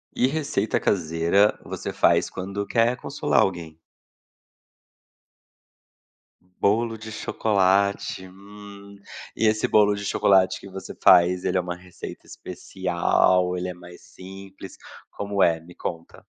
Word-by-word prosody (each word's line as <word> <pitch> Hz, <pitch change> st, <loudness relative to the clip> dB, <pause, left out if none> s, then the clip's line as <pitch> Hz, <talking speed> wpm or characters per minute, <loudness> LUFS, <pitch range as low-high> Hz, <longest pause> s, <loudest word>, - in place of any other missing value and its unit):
Que 125 Hz, -, +2 dB
receita 140 Hz, -6 st, -1 dB
caseira 85 Hz, +3 st, +1 dB
você -, -, -5 dB
faz -, -, +2 dB
quando 100 Hz, +2 st, -5 dB
quer 115 Hz, +1 st, +2 dB
consolar -, -, 0 dB
alguém? 85 Hz, -4 st, -3 dB, 2.8 s
Bolo 115 Hz, +3 st, +1 dB
de 110 Hz, 0 st, -9 dB
chocolate, 100 Hz, -3 st, 0 dB
hum. 100 Hz, +1 st, -13 dB, 0.4 s
E 110 Hz, -, +1 dB
esse 110 Hz, 0 st, +1 dB
bolo 105 Hz, -1 st, +4 dB
de 100 Hz, 0 st, -6 dB
chocolate 95 Hz, -1 st, +2 dB
que 100 Hz, -, -12 dB
você 95 Hz, 0 st, -9 dB
faz 90 Hz, +1 st, +5 dB
ele -, -, 0 dB
é 90 Hz, -, +2 dB
uma 90 Hz, 0 st, -5 dB
receita 90 Hz, 0 st, -11 dB
especial, 90 Hz, 0 st, 0 dB
ele 90 Hz, 0 st, -3 dB
é -, -, -5 dB
mais 90 Hz, 0 st, -14 dB
simples, 95 Hz, 0 st, -12 dB, 0.3 s
como 100 Hz, -1 st, -1 dB
é? 85 Hz, -1 st, +2 dB
Me 85 Hz, +2 st, -16 dB
conta. 85 Hz, -1 st, -7 dB
95 Hz, 125 wpm, -24 LUFS, 90-100 Hz, 2.8 s, faz